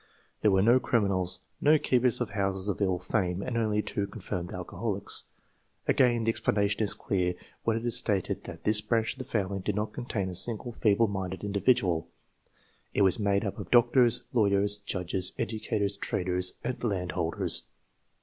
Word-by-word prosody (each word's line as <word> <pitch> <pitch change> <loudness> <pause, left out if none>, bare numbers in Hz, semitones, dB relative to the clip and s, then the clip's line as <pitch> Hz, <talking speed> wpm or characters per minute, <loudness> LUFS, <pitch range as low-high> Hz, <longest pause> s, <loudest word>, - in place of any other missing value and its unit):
There 105 - +4
were 95 -1 +3
no 120 +4 +5
criminals, 100 -7 +1 0.2
no 155 +2 +5
keepers 125 -4 +1
of 120 -4 -2
houses 95 -1 -1
of 100 - -3
ill 95 -2 +2
fame, 90 0 -1
and 125 - -4
only 105 -2 +1
two 100 -1 -2
confirmed 90 -5 -5
alcoholics. 95 +3 -2 0.6
Again 120 -2 +3
the 115 - +2
explanation 100 -1 0
is 105 - +3
clear 90 -2 -1 0.3
when 115 -1 +2
it 115 - -5
is 120 - +5
stated 100 -3 +1
that - - -9
this 105 0 +3
branch 115 0 0
of 135 - -18
the 130 - -5
family 100 -3 -2
did 95 +2 -2
not 105 +1 -2
contain 100 -6 -3
a - - -6
single 115 +6 -1
feeble 110 0 +2
minded 95 -2 -4
individual. 100 -4 +1 0.9
It 100 - +4
was 95 +2 +3
made 100 0 +1
up 100 - -4
of - - -7
doctors, 120 0 +4
lawyers, 105 -2 +2
judges, 90 -2 -2
educators, 110 -3 -2
traders, 90 -1 -1
and 125 0 -4
landholders. 90 -6 -1
100 Hz, 170 wpm, -28 LUFS, 95-115 Hz, 0.9 s, no